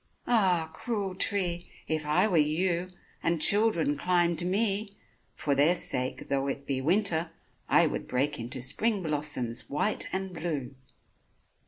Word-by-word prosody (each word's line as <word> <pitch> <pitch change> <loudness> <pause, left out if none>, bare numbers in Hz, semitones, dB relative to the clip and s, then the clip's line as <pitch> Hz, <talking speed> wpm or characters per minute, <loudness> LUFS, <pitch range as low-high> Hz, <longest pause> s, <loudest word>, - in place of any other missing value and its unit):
Ah! 185 -8 +2
cruel 205 -1 -3
tree! 180 -3 0 0.2
if 155 -1 -2
I 180 +7 +3
were 190 - 0
you, 170 +4 +1 0.3
And 165 0 0
children 200 -6 +3
climbed 175 0 +2
me, 200 +2 +1 0.4
for 145 - -1
their 145 +6 +4
sake 130 -6 -2
Though 140 0 0
it 140 0 -4
be 135 -2 -2
winter 170 +1 +1 0.4
I - - +5
would - - -3
break 140 +3 -1
Into 120 +3 -5
spring 195 - 0
blossoms 145 -6 -1
white 175 +9 -1
and 190 -1 -3
blue! 155 -6 -4
170 Hz, 140 wpm, -28 LUFS, 145-190 Hz, 0.4 s, I